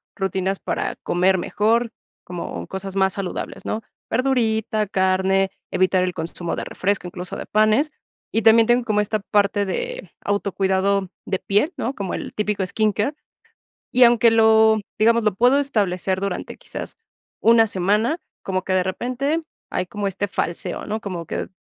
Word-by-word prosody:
rutinas 195 0 -1
para - - -2
comer 185 +2 +2
mejor, 225 +5 +1 0.3
como 170 - -6
cosas 190 - -6
más 190 -1 +2
saludables, 195 -2 -5
¿no?, 220 - -3 0.3
verdurita, 220 -4 +1
carne, 190 0 +2 0.2
evitar 185 0 +2
el 180 -1 -2
consumo 170 +1 -4
de - - -4
refresco, 200 0 -1
incluso 180 0 -6
de - - -6
panes, 215 +8 +3 0.4
y 225 - +1
también 225 0 +6
tengo 240 +1 +3
como 215 -3 +1
esta 215 +1 0
parte 205 0 +1
de 485 - -4
autocuidado 195 -1 0 0.2
de 190 - -1
piel, 210 - +1
¿no?, 255 - -2
como 195 -3 -4
el - - -6
típico 210 -2 -1
skin 215 +3 +1
care. 210 +9 -1 0.8
Y 250 0 +6
aunque 235 -1 +6
lo 220 -1 +5 0.2
digamos, 230 +1 +4
lo 210 -3 +2
puedo 245 +7 +4
establecer 190 -8 0
durante 195 -2 -4
quizás - - -7 0.4
una 225 0 +6
semana, 210 - +1 0.2
como 185 -1 -2
que 190 - -2
de 185 -1 +3
repente 255 - -1 0.3
hay 185 - -1
como 205 +2 -4
este 195 +1 -2
falseo, 175 -3 -3
¿no?, 215 +1 -3
como 180 -5 -5
que, - - -4
205 Hz, 160 wpm, -22 LUFS, 190-225 Hz, 0.8 s, también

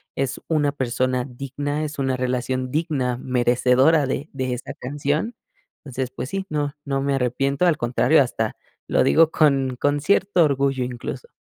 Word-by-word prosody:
es 135 -1 -2
una 150 -3 +1
persona 130 -1 -1
digna, 140 +3 -4
es 150 -1 -5
una 135 -1 0
relación 130 0 -2
digna, 145 -6 -1
merecedora 125 +4 +3
de 140 +3 -3
de 130 -2 -2
esta 125 - -6
canción. 145 - -2 0.5
Entonces, 130 -2 -4
pues 130 - -6
sí, 195 +2 -3
no 145 -1 -1
no 135 -1 -1
me 140 0 0
arrepiento, 135 +4 0
al 170 -3 +4
contrario, 125 +6 +3
hasta 110 -3 -3 0.3
lo - - +3
digo 160 0 +5
con 135 -4 +2
con 145 0 +1
cierto 195 +1 +3
orgullo 135 -3 +1
incluso. 125 - -6
135 Hz, 160 wpm, -22 LUFS, 125-150 Hz, 0.5 s, digo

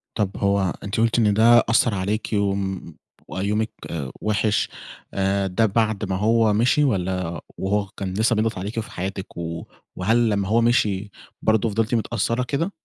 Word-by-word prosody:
طَب 100 -3 -1
هو 100 -3 +1
أنتِ 100 +2 -3
قلتِ 115 +1 +2
إن 105 -3 +3
ده 115 +3 +6
أثّر 115 0 +3
عليكِ 100 +3 -2
وم 95 -4 -1 0.3
وبقى 95 +1 -3
يومِك 110 +2 0 0.5
وِحش 105 0 +1 0.4
آآ، 95 0 +1
ده 95 +5 +2
بعد 110 0 0
ما 95 - 0
هو 110 +2 +3
مشِي 120 +7 +3
والّا 90 - -1 0.2
وهو 100 +2 0
كان 95 -1 -6
لسه 110 +4 +2
بيضغَط 110 0 0
عليكِ 100 +5 -5
وفي 110 - -4
حياتِك، 95 +1 -5
و 85 -1 -5 0.3
وهل 115 +5 +2
لما 100 -2 0
هو 115 +3 +3
مشِي 105 -4 +1 0.3
برضه 110 +1 +2
فضِلتِ 110 +3 0
متأثّرة 115 +2 0
كده؟ 145 +9 -1
105 Hz, 165 wpm, -23 LUFS, 95-115 Hz, 0.5 s, ده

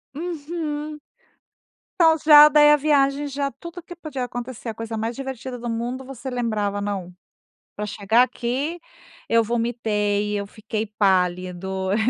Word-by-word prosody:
Uhum. 305 -2 -4 1.0
Então 325 -1 +6
já 300 -1 +10
daí 295 0 +6
a - - +8
viagem 285 -1 +2
já, 280 0 -2
tudo 340 +7 -10
que 350 +1 -11
podia 300 -7 -5
acontecer 245 -1 -7
a 225 - -2
coisa 225 0 -5
mais 225 +2 -3
divertida 260 -1 -6
do 240 0 -5
mundo 240 +3 -3
você 265 0 -7
lembrava: 215 -5 -1
"Não, 190 -3 -4 0.6
pra 210 - -4
chegar 210 +3 +2
aqui 260 +7 -2 0.5
eu 230 0 +3
vomitei, 210 -3 -1
eu 200 - -4
fiquei 215 +1 -4
pálido, 190 -2 0
eu - - +2
240 Hz, 145 wpm, -23 LUFS, 210-290 Hz, 1.0 s, já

